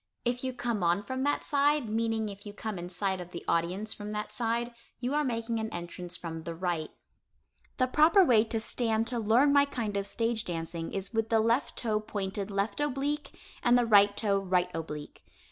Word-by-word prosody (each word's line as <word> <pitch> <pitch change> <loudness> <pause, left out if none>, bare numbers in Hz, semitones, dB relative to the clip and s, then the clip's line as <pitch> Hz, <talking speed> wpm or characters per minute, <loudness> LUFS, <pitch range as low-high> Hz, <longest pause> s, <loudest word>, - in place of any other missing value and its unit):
If 245 +1 0
you 260 - -1
come 240 -4 -2
on 175 +3 +2
from 260 +5 -4
that 290 - +1
side 290 -2 +2
(meaning 225 0 0
if 200 0 -8
you 205 - -7
come 210 -2 -5
in 175 +1 -6
sight 190 0 0
of 175 - -9
the 175 - -8
audience 180 +6 0
from 210 0 -7
that 210 0 -4
side) 235 0 0 0.3
you 250 +2 -2
are 300 0 +2
making 230 -3 -1
an 220 0 -2
entrance 175 +1 -5
from 165 -1 -6
the 165 +1 -6
right. 170 -3 -2 0.9
The 255 - +3
proper 315 +9 +5
way 230 -7 +5
to 225 0 -2
stand 225 0 0
to 240 -1 -2
learn 235 +7 +4
my 285 0 +6
kind 230 -7 -3
of 200 0 0
stage 225 +1 0
dancing 165 -1 -4
is 195 +3 -4
with 225 0 0
the 225 - +4
left 230 +5 +1
toe 215 -3 0
pointed 200 -1 -4
left 200 +2 -1
oblique, 295 +1 -2 0.2
and 245 0 +5
the 245 - +3
right 205 -2 +5
toe 200 -3 +2
right 180 -2 +1
oblique. 150 -2 -6
220 Hz, 205 wpm, -30 LUFS, 190-245 Hz, 0.9 s, my